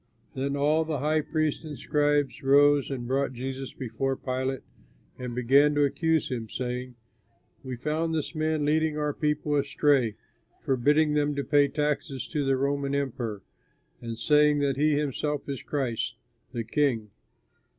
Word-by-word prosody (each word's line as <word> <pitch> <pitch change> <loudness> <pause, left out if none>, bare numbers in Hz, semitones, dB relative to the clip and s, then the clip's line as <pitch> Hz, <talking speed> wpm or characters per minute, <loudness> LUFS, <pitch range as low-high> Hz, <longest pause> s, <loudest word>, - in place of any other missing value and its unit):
Then 140 +1 -2
all 150 +3 +3
the 155 -2 -2
high 155 +3 +1
priests 155 0 -1
and 150 -3 -7
scribes 145 -3 +1
rose 145 +1 +4
and 125 -3 -4
brought 135 +1 0
Jesus 130 +2 -5
before 135 +2 -2
Pilate, 130 +1 -3 0.6
and 125 -2 -5
began 140 +4 +4
to 145 - +3
accuse 160 +3 +1
him, 115 -4 -4
saying, 125 +1 -4 0.7
"We 130 -1 -5
found 155 +6 -1
this 155 0 -2
man 155 -1 0
leading 155 0 +1
our 150 -1 -1
people 150 0 0
astray, 140 -5 +2 0.4
forbidding 145 +3 +2
them 145 -1 +1
to 140 - -1
pay 145 0 +4
taxes 145 -3 -2
to 150 -3 -1
the 135 -1 +2
Roman 140 +1 0
emperor, 120 -7 -3 0.6
and 115 -1 -5
saying 150 +2 +4
that 140 -2 +1
he 150 +2 +2
himself 150 0 -2
is 140 -4 -4
Christ, 130 -6 -2 0.4
the 120 -3 -3
King." 115 -4 0
140 Hz, 150 wpm, -27 LUFS, 130-150 Hz, 0.7 s, rose